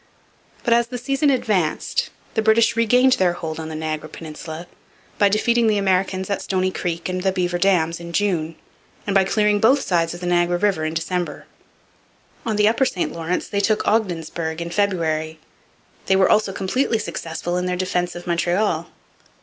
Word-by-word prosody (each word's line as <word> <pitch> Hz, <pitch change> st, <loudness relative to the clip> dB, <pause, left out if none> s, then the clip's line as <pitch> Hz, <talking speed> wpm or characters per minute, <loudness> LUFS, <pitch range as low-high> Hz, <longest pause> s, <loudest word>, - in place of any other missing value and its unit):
But, 235 Hz, -, +3 dB
as 235 Hz, 0 st, +3 dB
the 245 Hz, +1 st, -5 dB
season 275 Hz, +4 st, +1 dB
advanced, 205 Hz, -, 0 dB, 0.2 s
the 220 Hz, -, +1 dB
British 220 Hz, +1 st, +4 dB
regained 245 Hz, +3 st, +4 dB
their 180 Hz, -5 st, +2 dB
hold 160 Hz, -2 st, -5 dB
on 160 Hz, 0 st, -5 dB
the 160 Hz, -, -6 dB
Niagara 155 Hz, 0 st, -4 dB
peninsula 160 Hz, +1 st, -8 dB, 0.5 s
by 205 Hz, -, +5 dB
defeating 235 Hz, +3 st, +2 dB
the 215 Hz, -1 st, +3 dB
Americans 190 Hz, -1 st, 0 dB
at 200 Hz, -, -2 dB
Stoney 185 Hz, -1 st, 0 dB
Creek 170 Hz, -2 st, -3 dB
and 185 Hz, 0 st, -2 dB
the 190 Hz, 0 st, +1 dB
Beaver 180 Hz, -1 st, -1 dB
Dams 170 Hz, -4 st, +2 dB
in 170 Hz, 0 st, -8 dB
June, 170 Hz, -4 st, 0 dB, 0.5 s
and 200 Hz, -, -1 dB
by 195 Hz, -1 st, +5 dB
clearing 210 Hz, +1 st, +2 dB
both 260 Hz, +6 st, +4 dB
sides 170 Hz, -2 st, 0 dB
of -, -, -9 dB
the 180 Hz, -, -6 dB
Niagara 175 Hz, 0 st, +2 dB
river 190 Hz, -5 st, +1 dB
in 155 Hz, +1 st, -3 dB
December. 175 Hz, +2 st, -3 dB, 1.0 s
On 220 Hz, -, 0 dB
the 210 Hz, 0 st, +4 dB
upper 230 Hz, +5 st, +3 dB
St 180 Hz, -, -2 dB
Lawrence 165 Hz, +2 st, -2 dB
they 200 Hz, -, -1 dB
took 215 Hz, +1 st, +1 dB
Ogdensburg 170 Hz, -6 st, -1 dB
in 170 Hz, 0 st, -5 dB
February. 160 Hz, -5 st, 0 dB, 0.7 s
They 190 Hz, -, +4 dB
were 190 Hz, 0 st, +4 dB
also 210 Hz, -2 st, +3 dB
completely 225 Hz, +6 st, 0 dB
successful 175 Hz, -4 st, -4 dB
in 180 Hz, 0 st, -1 dB
their 180 Hz, 0 st, -1 dB
defence 180 Hz, -1 st, -1 dB
of 175 Hz, -, -8 dB
Montreal. 175 Hz, 0 st, 0 dB
185 Hz, 180 wpm, -21 LUFS, 170-210 Hz, 1.0 s, by